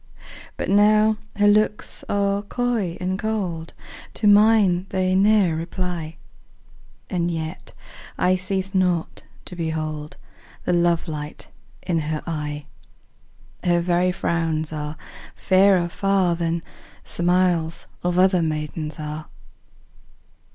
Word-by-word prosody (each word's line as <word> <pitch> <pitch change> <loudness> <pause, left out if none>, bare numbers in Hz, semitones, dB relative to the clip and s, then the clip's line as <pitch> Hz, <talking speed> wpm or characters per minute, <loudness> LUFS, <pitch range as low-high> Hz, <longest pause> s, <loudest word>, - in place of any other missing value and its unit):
But - - -3
now 210 +2 +4 0.2
her 205 0 +3
looks 210 0 +1
are 200 0 +1
coy 215 -5 -2
and 185 +1 -2
cold, 185 -7 -3 0.4
To 220 - -2
mine 205 -3 +5
they 185 -1 0
ne'er 195 -3 +4
reply, 170 -1 -4 0.9
And 175 -2 -1
yet 160 +1 -5 0.4
I 180 - +3
cease 190 +1 -2
not 180 -3 0 0.2
to 180 - -9
behold 155 -2 -4 0.5
The - - +1
love 170 -1 +2
light 150 -1 -6 0.3
in 170 -3 0
her 155 0 -3
eye: 150 -3 -4 1.0
10 175 - +2
Her - - +3
very 175 +1 +2
frowns 160 -3 -1
are 150 0 -5 0.4
fairer 190 -2 +4
far 190 -1 +1
Than 165 0 -2 0.4
smiles 175 -2 0 0.2
of 180 0 0
other 185 -1 +4
maidens 155 0 -3
are. 150 0 -5
175 Hz, 115 wpm, -23 LUFS, 160-195 Hz, 1.0 s, mine